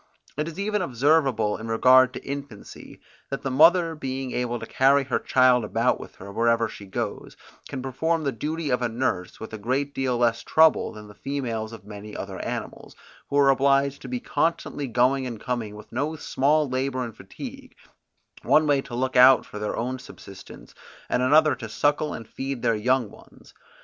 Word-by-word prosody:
It 150 +2 -2
is 165 - -8
even 210 +1 -1
observable 135 -6 +2
in 110 - -8
regard 130 +3 +5
to - - -8
infancy, 140 -6 -8 0.3
that 135 - -5
the 135 - -2
mother 165 +4 +5
being 135 -3 -4
able 120 -1 -2
to - - -7
carry 140 +1 +3
her 130 - -1
child 130 -2 +3
about 115 +4 0
with - - -11
her, 100 +1 -10
wherever 115 +1 +2
she 100 - -11
goes, 95 - -5 0.3
can 130 -3 -5
perform 160 +5 -1
the 140 - 0
duty 150 +5 -3
of 125 - +1
a 120 - 0
nurse 115 -6 -2
with 110 - -9
a 110 - -6
great 135 +6 -1
deal 130 -3 -1
less 115 -1 +1
trouble, 160 +5 +3
than 105 0 -11
the 105 - -13
females 115 -5 -4
of 115 -3 -11
many 105 0 -9
other - - -6
animals, - - -6 0.3
who 140 - 0
are 140 -1 +6
obliged 140 +1 +2
to - - -8
be 250 0 -3
constantly 165 - -1
going 130 +2 +2
and 115 -3 -6
coming 115 -4 -4
with 105 0 -13
no 145 +6 -2
small 150 +1 +1
labour 130 0 -2
and 115 -3 -7
fatigue, - - -10 0.7
one 155 - +4
way 145 -2 +2
to 120 - -8
look 130 +1 -2
out 130 +1 +7
for 105 - -9
their 105 - -3
own 130 +2 -3
subsistence, 100 -6 -13 0.4
and - - +1
another 150 +3 +5
to 120 -3 -7
suckle 145 +5 0
and 115 - -7
feed 135 -2 -5
their 115 -1 +3
young 125 +2 +1
ones. - - -18
130 Hz, 190 wpm, -25 LUFS, 115-140 Hz, 0.7 s, out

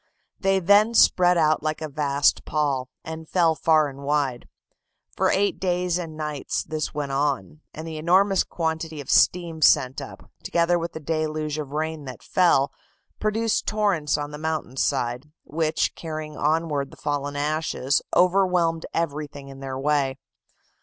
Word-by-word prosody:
They 195 0 +2
then 205 +5 +4
spread 180 -4 +5
out 155 -1 +3
like 155 0 -2
a 155 - -4
vast 145 -1 +1
pall, 140 -4 -1
and 160 0 -8
fell 170 -3 +3
far 155 -1 +3
and 140 -1 -9
wide. 140 -3 -1 0.7
For - - +2
eight 200 +1 +1
days 180 -1 0
and 160 -3 -7
nights 150 -2 -3
this 155 0 -3
went 145 -2 -4
on, 145 +2 -1
and 160 +1 -8
the 160 -1 -6
enormous 190 +5 +3
quantity 160 -2 -3
of 140 - -5
steam 170 -3 +3
sent 130 -3 +4
up, - - -11
together 170 +1 +1
with 170 0 -4
the - - -6
deluge 155 -1 -2
of 145 -2 -6
rain 155 -1 -3
that 130 -3 -9
fell, 170 -7 +3 0.5
produced 220 +1 0
torrents 200 -8 +1
on 145 0 -4
the 150 - -8
mountain 155 -4 -3
side, 125 +3 -1
which, 155 +1 -1
carrying 155 -2 -6
onward 150 -3 0
the - - -15
fallen 145 -1 -3
ashes, 145 -2 0
overwhelmed 180 -3 +2
everything 145 -3 -3
in 135 0 -11
their 135 -1 -5
way. 135 -1 0
155 Hz, 155 wpm, -24 LUFS, 145-170 Hz, 0.7 s, spread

